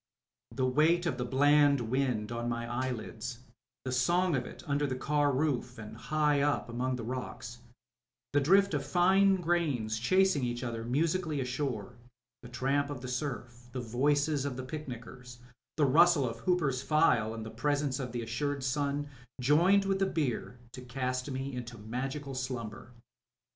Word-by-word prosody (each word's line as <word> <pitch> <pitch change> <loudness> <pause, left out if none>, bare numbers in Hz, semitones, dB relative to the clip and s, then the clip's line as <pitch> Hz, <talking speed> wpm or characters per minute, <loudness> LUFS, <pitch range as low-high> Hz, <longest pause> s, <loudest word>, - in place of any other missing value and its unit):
The 130 - -1
weight 155 +7 +3
of 135 -7 -1
the 125 - -1
bland 145 +2 +4
wind 120 -2 -1
on 120 0 -2
my 115 0 -2
eyelids; 120 -1 -4 0.4
the 130 - -2
song 175 +7 +2
of 125 -2 -2
it - - -11
under 145 -1 0
the 130 - -2
car 145 +2 +1
roof, 130 -3 -1
and 110 0 -9
high 150 +4 +1
up 145 -3 0
among 125 +2 -1
the 120 - -5
rocks; 120 -1 -6 0.7
the 145 - +4
drift 195 +6 +4
of 145 -2 0
fine 190 +6 +4
grains 155 -11 0
chasing 185 +3 +3
each 120 0 -2
other 115 -2 -4
musically 155 +5 0
ashore; 125 -4 -3 0.4
the 120 - -11
tramp 135 +3 0
of 140 -4 -6
the 130 - -6
surf; 125 -2 -5
the 130 - -3
voices 140 +5 +1
of 140 -3 -3
the 130 - -4
picnickers; 125 -3 -8 0.4
the 150 - +4
rustle 155 0 +5
of 115 0 -5
Hooper's 150 -5 +1
file, 125 -8 +2
and 110 -1 -6
the 110 - -7
presence 145 +3 0
of 125 -3 -4
the 120 -1 -3
assured 140 +4 -2
sun, 140 +2 -1 0.3
joined 170 +10 +4
with 195 0 0
the 195 - +2
beer 140 -7 -2
to 130 +1 -9
cast 125 +1 -3
me 135 +1 -4
into 120 -1 -6
magical 135 +6 -4
slumber. 120 -3 -5
130 Hz, 165 wpm, -31 LUFS, 120-150 Hz, 0.7 s, rustle